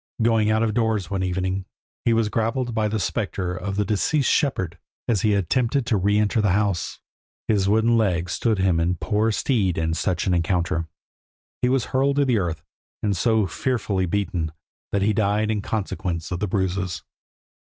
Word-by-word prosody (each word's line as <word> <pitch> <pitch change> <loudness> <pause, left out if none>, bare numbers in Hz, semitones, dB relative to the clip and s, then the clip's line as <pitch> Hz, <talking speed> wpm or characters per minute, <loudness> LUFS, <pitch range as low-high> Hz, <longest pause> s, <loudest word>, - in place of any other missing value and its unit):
Going 110 -2 +3
out 110 +1 +2
of 110 -2 0
doors 110 -5 0
one 95 -1 -1
evening, 95 +1 -1 0.4
he 120 - +4
was 115 -1 +2
grappled 115 +3 -1
by 110 -1 +1
the 110 +1 -1
spectre 95 -4 -2
of 95 +2 -4
the 105 0 +1
deceased 130 +8 +1
shepherd 90 - 0 0.3
as 110 -5 +2
he 105 -2 +3
attempted 120 - +1
to 115 - +1
re 100 +1 +2
enter 105 +2 +2
the 105 -4 +2
house. 100 -4 0 0.5
His 100 -3 +2
wooden 115 +2 +3
leg 90 -5 +1
stood 110 +4 0
him 95 -3 +2
in 85 +2 +1
poor 105 +6 0
stead 105 -6 +1
in 80 0 0
such 85 +1 -1
an 95 - +2
encounter; 85 -1 0 0.7
he 125 - +2
was 130 -1 +1
hurled 135 +1 +2
to 140 0 +3
the 125 -5 +2
earth, 85 -4 -3 0.4
and 100 -2 +1
so 110 +3 +2
fearfully 105 - -1
beaten, 90 -4 -1 0.4
that 100 -1 +1
he 105 +1 +3
died 105 +1 +1
in 105 -2 -1
consequence 95 -5 -3
of 90 - -2
the 105 - -1
bruises. 95 -1 -1
105 Hz, 185 wpm, -23 LUFS, 90-110 Hz, 0.7 s, he